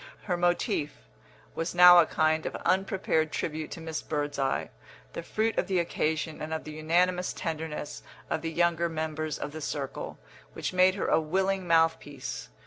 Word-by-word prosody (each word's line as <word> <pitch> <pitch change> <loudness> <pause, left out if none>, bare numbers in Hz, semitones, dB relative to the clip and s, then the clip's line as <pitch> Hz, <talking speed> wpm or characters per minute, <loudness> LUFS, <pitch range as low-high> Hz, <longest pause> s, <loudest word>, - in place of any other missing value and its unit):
Her 180 - -1
motif 175 -4 0 0.6
was 165 +2 -3
now 180 0 +10
a 165 - +5
kind 155 0 +1
of - - -5
unprepared 185 -5 +1
tribute 155 -1 -3
to - - -7
Miss 160 -1 -4
Birdseye, 145 -3 -2 0.4
the - - -4
fruit 220 +6 -1
of - - -1
the 190 -1 0
occasion 160 -2 -1
and 155 - -5
of 160 - -5
the 155 - -8
unanimous 180 +4 +1
tenderness 160 -2 -5 0.3
of - - -2
the 165 - -3
younger 170 0 +1
members 155 -1 -3
of - - -5
the 155 +1 -7
circle, 140 -2 -4 0.4
which - - -4
made 185 +1 +5
her 200 - -2
a - - +3
willing 190 +4 0
mouthpiece. 160 - 0
160 Hz, 165 wpm, -28 LUFS, 155-175 Hz, 0.6 s, now